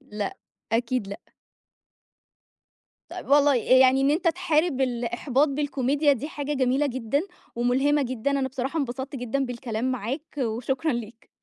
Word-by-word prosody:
لأ، 210 Hz, -7 st, -5 dB, 0.4 s
أكيد 235 Hz, -2 st, 0 dB
لأ. 200 Hz, -, -6 dB, 1.9 s
طيّب -, -, -8 dB
والله، 290 Hz, +1 st, +5 dB, 0.2 s
آآ -, -, +4 dB
يعني 260 Hz, +1 st, +5 dB
إن 275 Hz, +1 st, +3 dB
أنت 335 Hz, +3 st, +2 dB
تحارِب 330 Hz, -4 st, +1 dB
الإحباط 245 Hz, +3 st, +1 dB
بالكوميديا 285 Hz, 0 st, +1 dB
دي 275 Hz, +3 st, -3 dB
حاجة 290 Hz, -2 st, -4 dB
جميلة 265 Hz, +2 st, +2 dB
جدًا 260 Hz, +1 st, -1 dB, 0.4 s
وملهِمة 270 Hz, +5 st, +2 dB
جدًا، 255 Hz, +1 st, -2 dB
أنا 275 Hz, -1 st, 0 dB
بصراحة 270 Hz, +4 st, -3 dB
انبسطت 265 Hz, 0 st, -4 dB
جدًا 255 Hz, +2 st, -1 dB
بالكلام 240 Hz, 0 st, -3 dB
معاك 260 Hz, +6 st, -5 dB
وشكرًا 255 Hz, +5 st, -1 dB
ليك. 235 Hz, -1 st, -7 dB
265 Hz, 135 wpm, -25 LUFS, 240-285 Hz, 1.9 s, والله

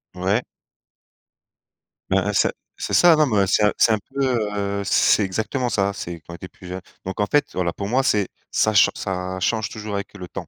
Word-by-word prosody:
Ouais. 95 Hz, +6 st, 0 dB, 1.7 s
Ben, 95 Hz, -, +3 dB
hein, 105 Hz, -, 0 dB
c'est -, -, +3 dB, 0.2 s
c'est -, -, -5 dB
ça, 175 Hz, -2 st, +7 dB
non 155 Hz, -1 st, +3 dB
mais 110 Hz, -5 st, 0 dB
heu, -, -, +2 dB
c'est 100 Hz, -, +2 dB
un 105 Hz, -, +4 dB
c'est -, -, +4 dB
un 110 Hz, -, 0 dB
peu, 125 Hz, -6 st, 0 dB
heu, 100 Hz, 0 st, -2 dB
c'est 100 Hz, +1 st, +3 dB
exactement 110 Hz, +6 st, -2 dB
ça, 100 Hz, -2 st, 0 dB
c'est 85 Hz, -3 st, -6 dB
quand 85 Hz, -, -12 dB
on -, -, -6 dB
était 90 Hz, +2 st, -10 dB
plus 90 Hz, -, -14 dB
jeune. 90 Hz, +1 st, -6 dB, 0.2 s
Donc 95 Hz, -, -5 dB
en 105 Hz, -, +1 dB
fait, 145 Hz, +6 st, +2 dB
voilà, 90 Hz, -1 st, -1 dB
pour 100 Hz, +4 st, -5 dB
moi, 130 Hz, +4 st, +2 dB
c'est 105 Hz, -6 st, +2 dB, 0.2 s
ça 110 Hz, -, +2 dB
chan 100 Hz, -, +5 dB
ça 95 Hz, -1 st, -4 dB
change 110 Hz, +3 st, 0 dB
toujours 105 Hz, -1 st, -7 dB
avec 100 Hz, 0 st, -5 dB
le 90 Hz, -, -8 dB
temps. -, -, -7 dB
100 Hz, 225 wpm, -22 LUFS, 95-110 Hz, 1.7 s, ça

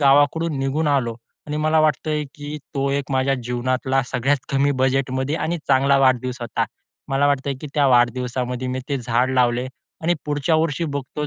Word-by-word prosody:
गावाकडून 145 Hz, +3 st, +3 dB
निघून 140 Hz, +4 st, 0 dB
आलो. 130 Hz, -5 st, +1 dB, 0.3 s
आणि 150 Hz, 0 st, -3 dB
मला 155 Hz, +1 st, +2 dB
वाटतंय 155 Hz, 0 st, +1 dB
की 145 Hz, +1 st, -6 dB, 0.2 s
तो 140 Hz, 0 st, 0 dB
एक 140 Hz, 0 st, -2 dB
माझ्या 135 Hz, +1 st, +2 dB
जीवनातला 130 Hz, +2 st, 0 dB
सगळ्यात 130 Hz, +4 st, +1 dB, 0.2 s
कमी 140 Hz, +1 st, +3 dB
बजेटमध्ये 130 Hz, +2 st, 0 dB
आणि 165 Hz, +3 st, -2 dB
चांगला 140 Hz, +1 st, +4 dB
वाढदिवस 130 Hz, -1 st, +2 dB
होता. 120 Hz, -2 st, -1 dB, 0.4 s
मला 135 Hz, +1 st, +2 dB
वाटतंय 140 Hz, -1 st, 0 dB
की 150 Hz, -, -6 dB
त्या 145 Hz, -2 st, +3 dB
वाढदिवसामध्ये 125 Hz, 0 st, +1 dB
मी 130 Hz, +1 st, -2 dB
ते 140 Hz, -, 0 dB
झाड 120 Hz, +1 st, +1 dB
लावले 125 Hz, 0 st, +2 dB, 0.4 s
आणि 175 Hz, +2 st, +2 dB
पुढच्या 145 Hz, +2 st, +1 dB
वर्षी 165 Hz, +1 st, 0 dB
बघतो 145 Hz, +2 st, -4 dB
135 Hz, 165 wpm, -22 LUFS, 130-145 Hz, 0.4 s, चांगला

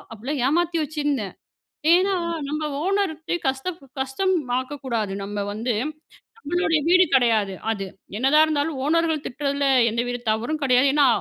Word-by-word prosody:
அப்டீலாம் 260 Hz, +6 st, -3 dB
ஏமாத்தி 340 Hz, +1 st, +1 dB
வச்சிருந்தேன். 290 Hz, -9 st, -2 dB, 0.6 s
ஏன்னா, 375 Hz, +3 st, +4 dB, 0.3 s
நம்ம 305 Hz, +2 st, -3 dB, 0.2 s
ஓனர்ட்ட 365 Hz, -4 st, -1 dB
கஷ்டம் 265 Hz, +7 st, -2 dB, 0.2 s
கஷ்டம் 270 Hz, +9 st, 0 dB, 0.2 s
ஆக்கக்கூடாது. 255 Hz, -6 st, -3 dB
நம்ம 205 Hz, 0 st, -3 dB
வந்து, 230 Hz, +3 st, -2 dB, 0.6 s
நம்மளுடைய 345 Hz, -4 st, 0 dB
வீடு 365 Hz, +1 st, +6 dB
கெடையாது. 225 Hz, -6 st, +3 dB, 0.2 s
அது 200 Hz, -3 st, -3 dB, 0.3 s
என்னதான் 275 Hz, +6 st, +5 dB
இருந்தாலும் 305 Hz, -2 st, -1 dB
ஓனர்கள் 320 Hz, -1 st, +1 dB
திட்டுறதில 280 Hz, +1 st, -1 dB, 0.2 s
எந்த 230 Hz, +2 st, -1 dB
வித 245 Hz, 0 st, -3 dB
தவறும் 240 Hz, +8 st, -2 dB
கெடையாது. 255 Hz, +1 st, +4 dB
ஏன்னா, 290 Hz, -2 st, +5 dB
285 Hz, 130 wpm, -23 LUFS, 245-320 Hz, 0.6 s, வீடு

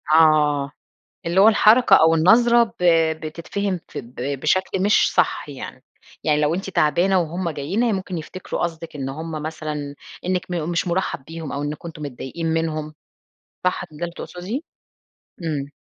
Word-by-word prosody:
آه، 150 Hz, -3 st, +4 dB, 0.6 s
اللي 170 Hz, +3 st, +3 dB
هو 205 Hz, -, +8 dB
الحركة 225 Hz, +2 st, +6 dB
أو 160 Hz, 0 st, +5 dB
النظرة 235 Hz, +8 st, +5 dB, 0.2 s
ب -, -, -1 dB, 0.4 s
بتتفهم 175 Hz, +4 st, -3 dB
فب 120 Hz, +1 st, -8 dB, 0.3 s
بشكل 185 Hz, +4 st, +1 dB
مش 205 Hz, +2 st, +3 dB
صح -, -, +1 dB
يعني، -, -, -8 dB, 0.4 s
يعني 150 Hz, -1 st, +2 dB
لو 150 Hz, +2 st, +2 dB
أنتِ 195 Hz, +2 st, -4 dB
تعبانة 185 Hz, +3 st, +3 dB
وهُم 170 Hz, +1 st, -2 dB
جايين 155 Hz, +9 st, -2 dB
هي 235 Hz, -2 st, +2 dB
ممكن 185 Hz, -2 st, -3 dB
يفتكروا 175 Hz, +4 st, -6 dB
قصدِك 165 Hz, -2 st, -4 dB
إن 135 Hz, -2 st, -4 dB
هُم 155 Hz, +2 st, -5 dB
مثلًا 150 Hz, -2 st, -5 dB, 0.3 s
أنِك 185 Hz, 0 st, -1 dB
مو 170 Hz, -3 st, -2 dB
مش 170 Hz, +2 st, -1 dB
مُرحّب 175 Hz, -6 st, -1 dB
بيهم 160 Hz, -1 st, -7 dB
أو 140 Hz, -, -3 dB
أنكم 150 Hz, +3 st, -5 dB
أنتم 160 Hz, -2 st, -10 dB
متضايقين 145 Hz, +4 st, -5 dB
منهم. 160 Hz, -1 st, -1 dB, 0.7 s
صح 180 Hz, -1 st, 0 dB
كان 155 Hz, -4 st, -14 dB
ده 175 Hz, -, -2 dB
اللي 170 Hz, 0 st, -6 dB
تقصدية؟ 190 Hz, +9 st, -5 dB, 0.8 s
إمم. 145 Hz, -3 st, -3 dB
165 Hz, 160 wpm, -22 LUFS, 150-185 Hz, 0.8 s, هو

